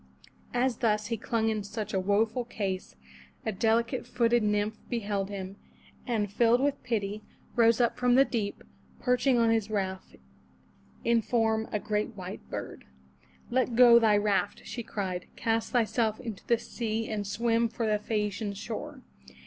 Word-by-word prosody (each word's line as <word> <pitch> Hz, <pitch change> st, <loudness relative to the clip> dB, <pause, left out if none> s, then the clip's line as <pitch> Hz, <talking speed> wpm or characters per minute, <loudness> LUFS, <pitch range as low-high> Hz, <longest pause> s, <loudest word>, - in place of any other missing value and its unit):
As 250 Hz, 0 st, +1 dB
thus 210 Hz, -3 st, +1 dB
he -, -, +2 dB
clung 225 Hz, +1 st, 0 dB
in 215 Hz, -2 st, -1 dB
such 210 Hz, +1 st, -5 dB
a 190 Hz, -, +2 dB
woeful 215 Hz, +5 st, +1 dB
case, 195 Hz, -, -4 dB, 0.5 s
a 220 Hz, -, 0 dB
delicate 230 Hz, +5 st, +1 dB
footed 240 Hz, -1 st, +2 dB
nymph 210 Hz, +1 st, 0 dB
beheld 205 Hz, -4 st, -2 dB
him, 195 Hz, -1 st, -6 dB, 0.5 s
and 210 Hz, -4 st, -1 dB
filled 235 Hz, +2 st, +4 dB
with 280 Hz, +1 st, 0 dB
pity, 215 Hz, -4 st, -2 dB, 0.3 s
rose 230 Hz, -1 st, +5 dB
up 240 Hz, -1 st, +1 dB
from 250 Hz, -1 st, +4 dB
the 270 Hz, +1 st, +6 dB
deep, 215 Hz, -6 st, -3 dB, 0.4 s
perching 250 Hz, 0 st, +2 dB
on 230 Hz, -1 st, +4 dB
his 220 Hz, -2 st, +1 dB
raft, 190 Hz, -, -3 dB, 0.9 s
in 235 Hz, 0 st, +3 dB
form 220 Hz, -1 st, +1 dB
a 210 Hz, -, +1 dB
great 210 Hz, +2 st, -2 dB
white 185 Hz, -2 st, -7 dB
bird. -, -, -6 dB, 0.7 s
"Let 250 Hz, -1 st, +1 dB
go 240 Hz, -1 st, +8 dB
thy 215 Hz, -3 st, +4 dB
raft," 205 Hz, -1 st, 0 dB
she 240 Hz, -, -5 dB
cried. 190 Hz, -5 st, -4 dB
"Cast 225 Hz, 0 st, -1 dB
thyself 225 Hz, -2 st, +1 dB
into 230 Hz, -6 st, -7 dB
the 235 Hz, -, +4 dB
sea 225 Hz, -1 st, -3 dB
and 205 Hz, -2 st, -3 dB
swim 230 Hz, +2 st, +1 dB
for 225 Hz, +1 st, -3 dB
the 210 Hz, -1 st, +1 dB
Phae 210 Hz, 0 st, -1 dB
a'ci 205 Hz, +1 st, -5 dB
an 205 Hz, -2 st, -2 dB
shore. 255 Hz, +7 st, -6 dB
220 Hz, 165 wpm, -29 LUFS, 205-235 Hz, 0.9 s, go